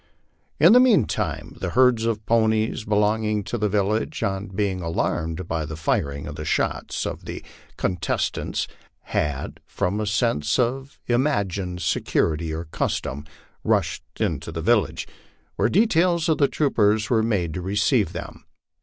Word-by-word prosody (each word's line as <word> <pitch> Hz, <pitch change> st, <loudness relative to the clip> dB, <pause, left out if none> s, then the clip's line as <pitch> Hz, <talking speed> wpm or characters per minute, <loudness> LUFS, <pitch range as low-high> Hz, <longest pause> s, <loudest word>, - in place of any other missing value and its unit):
In 170 Hz, +7 st, +8 dB
the 250 Hz, -, +8 dB
mean 225 Hz, -, +5 dB
time -, -, -3 dB
the -, -, -1 dB
herds 125 Hz, -2 st, +4 dB
of 110 Hz, -2 st, -1 dB
ponies 110 Hz, 0 st, +1 dB
belonging 105 Hz, 0 st, +1 dB
to 110 Hz, -, -4 dB
the 105 Hz, -2 st, 0 dB
village, 105 Hz, +8 st, 0 dB
on 95 Hz, +1 st, -1 dB
being 95 Hz, -1 st, -2 dB
alarmed 85 Hz, 0 st, -2 dB
by 80 Hz, -1 st, -1 dB
the 80 Hz, +1 st, -6 dB
firing 70 Hz, -1 st, -1 dB
and 75 Hz, +1 st, -7 dB
shouts -, -, -1 dB
of -, -, -5 dB
the -, -, -6 dB, 0.3 s
contestants, 90 Hz, -3 st, -1 dB, 0.4 s
had, 70 Hz, -2 st, -2 dB
from 100 Hz, +4 st, -1 dB
a 105 Hz, -, -2 dB
sense 100 Hz, -, +1 dB
of 130 Hz, +3 st, -1 dB
im 120 Hz, +3 st, +2 dB
agined 95 Hz, -, -1 dB
security 80 Hz, 0 st, 0 dB
or 80 Hz, +2 st, -4 dB
custom, 70 Hz, -2 st, -3 dB, 0.4 s
rushed -, -, +1 dB, 0.2 s
into 80 Hz, 0 st, -1 dB
the 80 Hz, 0 st, -5 dB
village, 115 Hz, +1 st, +1 dB, 0.5 s
where -, -, +2 dB
details 175 Hz, -4 st, +3 dB
of 160 Hz, -, +2 dB
troopers 110 Hz, -6 st, +2 dB
were 115 Hz, -2 st, +4 dB
made 100 Hz, -8 st, 0 dB
to 90 Hz, -, -4 dB
receive 100 Hz, +3 st, +1 dB
them. -, -, -8 dB
105 Hz, 145 wpm, -24 LUFS, 85-115 Hz, 0.5 s, In